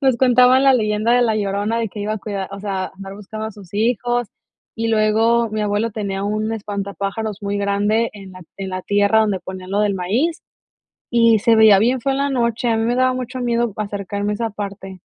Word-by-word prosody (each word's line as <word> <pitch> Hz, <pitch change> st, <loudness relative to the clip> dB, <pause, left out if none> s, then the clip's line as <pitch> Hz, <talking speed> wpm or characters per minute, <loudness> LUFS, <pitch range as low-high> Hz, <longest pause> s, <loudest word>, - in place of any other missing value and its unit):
nos 265 Hz, -4 st, +3 dB
contaban 255 Hz, +1 st, +5 dB
la 270 Hz, -1 st, +5 dB
leyenda 215 Hz, 0 st, +1 dB
de 245 Hz, 0 st, +4 dB
La 220 Hz, -2 st, +1 dB
Llorona 205 Hz, +2 st, -1 dB
de 230 Hz, -1 st, -1 dB
que 205 Hz, -, -8 dB
iba 210 Hz, +1 st, -2 dB
a 215 Hz, -, -3 dB
cuidar 195 Hz, -2 st, -5 dB
o 200 Hz, -, -7 dB
sea, 190 Hz, -2 st, -3 dB
andar 195 Hz, 0 st, -9 dB
buscando 215 Hz, +2 st, -7 dB
a -, -, -5 dB
sus 200 Hz, -4 st, -15 dB
hijos 240 Hz, +2 st, 0 dB, 0.5 s
y 230 Hz, 0 st, -1 dB
luego 225 Hz, +2 st, +2 dB
mi 215 Hz, 0 st, -3 dB
abuelo 210 Hz, +2 st, 0 dB
tenía 200 Hz, -2 st, -4 dB
un 215 Hz, +2 st, -1 dB
espantapájaros 200 Hz, 0 st, -4 dB
muy 200 Hz, 0 st, -2 dB
grande 205 Hz, +3 st, +1 dB
en 195 Hz, -2 st, -11 dB
la 185 Hz, 0 st, -11 dB
en 195 Hz, -1 st, -5 dB
la 185 Hz, 0 st, -4 dB
tierra 205 Hz, +2 st, +3 dB
donde 205 Hz, -4 st, 0 dB
ponían 185 Hz, 0 st, -8 dB
lo 205 Hz, -, +1 dB
del 205 Hz, -2 st, +1 dB
maíz 230 Hz, -, -1 dB, 0.7 s
y 230 Hz, -2 st, +4 dB
se 225 Hz, +2 st, +4 dB
veía 220 Hz, -2 st, +7 dB
bien 245 Hz, +3 st, +1 dB
feo 275 Hz, +3 st, 0 dB
en 270 Hz, -, -1 dB
la 280 Hz, 0 st, 0 dB
noche, 235 Hz, -2 st, 0 dB
a 230 Hz, -, +2 dB
mí 225 Hz, -, 0 dB
me 240 Hz, +1 st, +1 dB
daba 255 Hz, 0 st, +2 dB
mucho 255 Hz, 0 st, -5 dB
miedo 235 Hz, -2 st, 0 dB
acercarme 205 Hz, 0 st, -3 dB
a -, -, -3 dB
esa 230 Hz, +1 st, -2 dB
parte. 195 Hz, -2 st, -7 dB
215 Hz, 220 wpm, -20 LUFS, 200-235 Hz, 0.7 s, veía